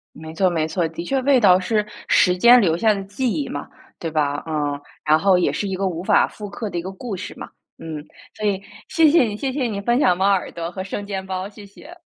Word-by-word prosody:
没 160 +1 -9
错 185 +3 +2
没 160 -3 -1
错， 170 +1 -1
的 165 +1 -7
确 270 +8 -1
味 270 0 +4
道 185 -5 +6
是 210 +2 0 0.2
时 180 -1 +4
间 240 +6 +7
留 165 -6 +2
下 215 +4 +3
的 200 -1 -4
记 215 +6 -2
忆 150 -7 -2
嘛， 145 - -6 0.3
对 165 - -3
吧？ 145 -2 -1
嗯， 145 -2 -2 0.3
然 155 +1 +4
后 190 +1 +4
也 180 - +2
是 205 - -3
一 190 - -2
个 195 +1 -1
无 175 -1 -4
法 205 +1 +4
复 210 -1 -9
刻 215 +1 -5
的 175 - -5
一 - - -1
个 185 +3 -6
故 200 +2 -6
事 180 - -7
嘛， - - -8 0.3
嗯。 155 -2 -7 0.3
所 215 - -5
以 195 -2 0 0.3
谢 325 -2 +4
谢 325 -1 +5
你， 210 -3 -3
谢 270 +3 -2
谢 265 -1 -1
你 215 -4 -2
分 240 +4 +1
享 180 -11 +3
猫 190 - +1
耳 195 -2 +1
朵 170 0 -5
和 190 0 -5
生 200 +2 -5
煎 195 -2 -4
包， 185 0 -4
谢 205 0 -13
谢。 295 - -14
190 Hz, 280 characters per minute, -21 LUFS, 170-215 Hz, 0.3 s, 间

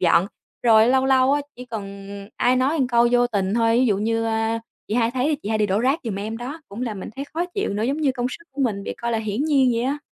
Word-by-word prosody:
dọn. 175 +1 +4 0.4
Rồi 225 -1 +6
lâu 265 +1 +3
lâu 265 0 +4
á, 290 - +2 0.2
chỉ 250 - -8
cần 200 -4 -7 0.3
ai 250 +1 +3
nói 265 +5 +2
một 265 - +2
câu 240 -1 +3
vô 245 0 +4
tình 200 -3 -1
thôi, 230 -1 +3
ví 255 - +4
dụ 205 -4 +2
như, 225 +1 0
a: 225 0 0 0.3
"Chị 210 - -2
hai 230 -1 +2
thấy 265 +4 0
chị 205 - -5
hai 220 - 0
đi 210 - +2
đổ 200 +2 +1
rác 270 +6 +2
giùm 220 - -3
em", 215 +2 -4
đó, 265 +7 -6
cũng 215 +5 -6
làm 215 -5 -4
mình - - -6
thấy 275 - -4
khó 340 - 0
chịu 400 - -1
nữa, 210 - -1
giống 270 +5 0
như 290 -4 +1
công 245 -1 -2
sức 335 - -9
của 280 - -5
mình 205 -5 -1
bị - - -5
coi 235 0 -2
là 225 - +1
hiển 220 +5 -2
nhiên 275 -5 +3
vậy 235 +1 0
đó. 295 - -6
235 Hz, 290 wpm, -23 LUFS, 220-260 Hz, 0.4 s, Rồi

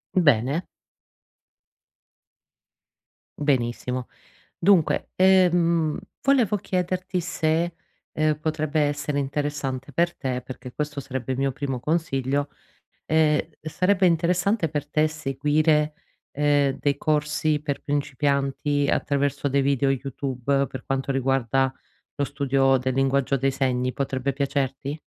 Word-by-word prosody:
Bene. 145 -2 +3 2.8
Benissimo. 125 -3 -1 0.5
Dunque, 185 -3 +3
ehm, 175 -4 +4 0.2
volevo 245 -7 +3
chiederti 185 0 -2
se, 165 0 0 0.4
ehm, 155 -1 +1
potrebbe 155 -1 -1
essere 145 0 0
interessante 140 -1 -3
per 170 +4 +1
te, 130 -1 -2
perché 125 0 -9
questo 150 0 -3
sarebbe 130 -2 -4
il 130 - -3
mio 135 0 +1
primo 135 -1 -3
consiglio, 140 -1 -1 0.6
ehm, 155 -1 +3 0.2
sarebbe 185 +5 +1
interessante 175 +2 +2
per 145 -1 -3
te 155 0 +2
seguire, 150 +1 +1 0.4
ehm, 145 -1 +2
dei 140 -1 +1
corsi 150 0 0
per 145 -2 -3
principianti 140 0 0
attraverso 140 0 0
dei 140 +1 +2
video 140 0 +2
YouTube, 135 0 -1
per 130 - -8
quanto 135 0 -1
riguarda 135 0 +1 0.4
lo 145 - -1
studio 135 -1 +2
del 130 0 -1
linguaggio 135 0 +1
dei 135 +1 +1
segni. 130 -1 0
Potrebbe 135 0 -2
piacerti? 140 +1 -2
145 Hz, 110 wpm, -24 LUFS, 135-155 Hz, 2.8 s, ehm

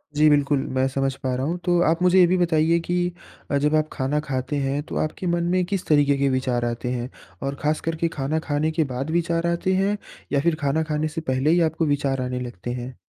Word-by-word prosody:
जी, 155 +1 +5
बिल्कुल। 145 -1 +3 0.2
मैं 130 0 +2
समझ 135 0 -1
पा 130 -1 -3
रहा 130 +1 -2
हूँ। 170 +4 -1
तो, 175 -1 +3
आप 165 +1 +2
मुझे 180 +1 +5
ये 180 - +8
भी 185 +2 +2
बताईए 165 -1 +3
कि 175 0 0 0.4
अ, 140 - +3
जब 150 +2 +2
आप 155 0 +1
खाना 135 +3 0
खाते 130 -1 -3
हैं 140 +1 -1
तो - - -8
आपके 155 +4 -2
मन 170 0 +1
में 185 0 +2
किस 195 0 -3
तरीक़े 145 -2 +4
के 140 0 +2
विचार 130 -2 0
आते 120 +1 -3
हैं? 125 0 -3 0.3
और 135 +1 -2
ख़ास 155 +1 0
करके 165 0 -1
खाना 145 +3 0
खाने 155 +1 +1
के 160 0 +1
बाद 135 +5 -3
विचार 170 0 0
आते 170 +2 0
हैं 195 +2 +1 0.3
या 140 - +2
फ़िर 165 +3 +1
खाना 145 +3 +1
खाने 150 +1 0
से 160 +1 -5
पहले 130 +3 +1
ही 175 +2 +4
आपको 165 +1 -1
विचार 140 -3 0
आने 125 0 -2
लगते 120 -2 -6
हैं? 125 +1 -6
150 Hz, 240 wpm, -23 LUFS, 135-170 Hz, 0.4 s, ये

